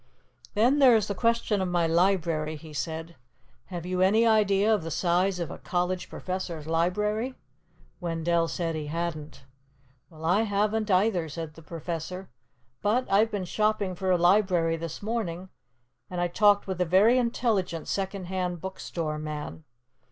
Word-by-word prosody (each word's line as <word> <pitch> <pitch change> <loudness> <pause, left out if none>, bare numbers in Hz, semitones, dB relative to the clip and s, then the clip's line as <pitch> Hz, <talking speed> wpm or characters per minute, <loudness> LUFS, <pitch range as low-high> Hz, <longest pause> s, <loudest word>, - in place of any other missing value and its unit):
"Then 245 +7 +4
there 260 -4 +7
is 215 -2 +2
the 200 - -1
question 230 -1 +1
of 185 - 0
my 175 -1 +2
library," 165 -3 +1
he 155 0 -11
said. 160 +3 -4 0.5
"Have 175 -2 -6
you 180 0 -1
any 215 +5 +4
idea 215 -1 +4
of 210 - +1
the 165 - -5
size 180 +3 +1
of 170 - -3
a - - -8
college 180 0 -2
professor's 180 -4 -5
library?" 210 +9 0 0.6
Wendell 170 -1 0
said 165 -1 -2
he 155 -2 -4
hadn't. 155 -4 -5 0.6
"Well, 160 0 -10
I 180 +6 +3
haven't 210 0 0
either," 185 -3 +2
said 160 0 -6
the 165 - -14
Professor. 170 +3 -6 0.5
"But 235 +5 +1
I've 210 +3 +4
been 205 -4 -3
shopping 210 0 0
for 185 +1 -3
a 180 - +4
library 175 -2 +3
this 165 +3 -6
morning, 190 -5 -3 0.6
and 180 - -4
I 175 - +1
talked 205 +2 +4
with 185 -2 -3
a - - +3
very 205 +9 +5
intelligent 220 -8 -1
second 195 0 -2
hand 180 -1 -2
bookstore 165 -4 -4
man. 155 0 -6
180 Hz, 160 wpm, -27 LUFS, 165-205 Hz, 0.6 s, there